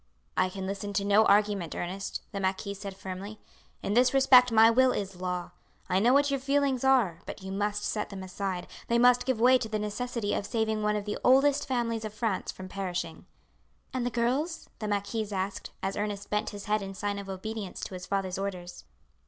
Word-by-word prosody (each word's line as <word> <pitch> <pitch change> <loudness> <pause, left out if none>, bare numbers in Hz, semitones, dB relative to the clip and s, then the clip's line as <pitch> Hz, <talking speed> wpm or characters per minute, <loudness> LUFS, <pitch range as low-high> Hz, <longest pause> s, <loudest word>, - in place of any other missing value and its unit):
"I 185 - +2
can 190 0 -6
listen 200 +1 -4
to 200 0 0
no 205 +2 +5
argument, 205 -5 +2
Ernest," 185 +2 -4
the 200 - -4
marquis 195 +1 -1
said 195 -1 -8
firmly. 195 +3 -7 0.5
"In 200 - -1
this 250 +3 +4
respect 255 -2 +7
my 225 0 +7
will 260 +2 +5
is 195 -2 -4
law. 180 -1 -3 0.4
I 185 +1 +3
know 235 +5 +4
what 280 +1 +4
your 275 - 0
feelings 275 -1 +1
are, 245 -11 +3
but - - -7
you 190 - -6
must 205 +1 -1
set 210 - -2
them 195 -2 -7
aside, 185 -1 -4 0.2
they 235 - +2
must 245 +1 +5
give 260 -4 +1
way 255 +2 +6
to 220 - -4
the 215 - -1
necessity 210 +1 -2
of 205 - -2
saving 220 -2 0
one 210 0 +1
of 205 -1 -3
the 210 - -3
oldest 280 +3 +4
families 235 -4 -1
of 215 -1 -6
France 220 -4 -1
from 185 - -9
perishing." 180 -3 -4 0.7
"And 255 -2 -1
the 245 - 0
girls?" 260 +8 -1
the 215 - -3
marquise 205 +1 -2
asked, 195 0 -3
as 195 0 -1
Ernest 205 -1 -4
bent 210 +1 0
his 205 -1 -8
head 215 0 +1
in 195 0 -6
sign 205 +1 -2
of 195 -1 -8
obedience 200 +1 -5
to - - -5
his 180 0 -7
father's 195 -2 -1
orders. 180 -3 -5
210 Hz, 210 wpm, -29 LUFS, 195-235 Hz, 0.7 s, respect